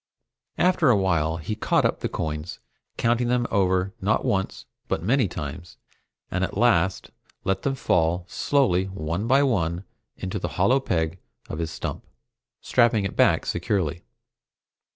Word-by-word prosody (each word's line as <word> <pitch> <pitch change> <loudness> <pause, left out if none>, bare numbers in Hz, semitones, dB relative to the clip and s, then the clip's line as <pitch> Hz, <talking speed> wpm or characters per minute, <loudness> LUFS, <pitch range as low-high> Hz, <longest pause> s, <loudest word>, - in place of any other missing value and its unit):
After 180 -5 +3
a 115 - +5
while 85 -4 +1
he 85 +6 -4
caught 110 - +1
up - - +1
the - - -2
coins, 75 +1 -4 0.4
counting 120 +1 +1
them 120 0 +1
over 95 -1 +1
not 100 +3 +1
once 95 -1 -1 0.2
but 80 - -2
many 125 +3 +2
times, 85 +1 -7 0.5
and 90 +1 0
at - - -3
last 95 -6 +2 0.3
let 95 - 0
them 140 -2 -1
fall 85 -7 +1
slowly 115 -11 +1
one 95 +1 -3
by 135 +3 +5
one 90 - 0 0.3
into 95 +2 -4
the - - -2
hollow 120 +9 +4
peg 85 -7 -1 0.3
of 75 - -5
his 80 -1 -2
stump, - - -5 0.6
strapping 120 -4 +3
it 95 - -4
back - - +3
securely. 85 -5 -1
95 Hz, 150 wpm, -25 LUFS, 85-120 Hz, 0.6 s, a